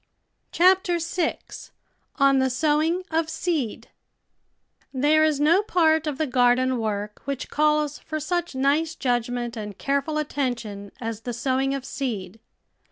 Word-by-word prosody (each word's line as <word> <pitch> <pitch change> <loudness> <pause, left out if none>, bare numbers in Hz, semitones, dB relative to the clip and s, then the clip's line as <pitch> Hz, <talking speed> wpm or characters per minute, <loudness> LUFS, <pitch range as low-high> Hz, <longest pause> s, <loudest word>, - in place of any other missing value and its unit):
CHAPTER 365 0 +4
SIX 335 0 -4 0.4
ON 275 -2 +4
THE 265 0 +2
SOWING 310 +6 +1
OF 320 0 0
SEED 320 -7 -2 1.0
1 260 0 -3
HERE 310 +1 +5
is 305 -2 +2
no 325 +6 +4
part 320 -6 +2
of 290 -3 -2
the 315 - 0
garden 250 -1 +2
work 210 -1 -3
which 275 -2 -4
calls 300 -1 +1
for 310 - -5
such 345 0 -2
nice 285 +5 +1
judgment 245 -1 -1
and 210 -3 -6
careful 280 +2 -1
attention 240 -9 -3
as 225 -2 -5
the 245 +1 -5
sowing 265 +3 0
of 270 -1 -6
seed. 225 -9 -4
275 Hz, 140 wpm, -24 LUFS, 245-315 Hz, 1.0 s, HERE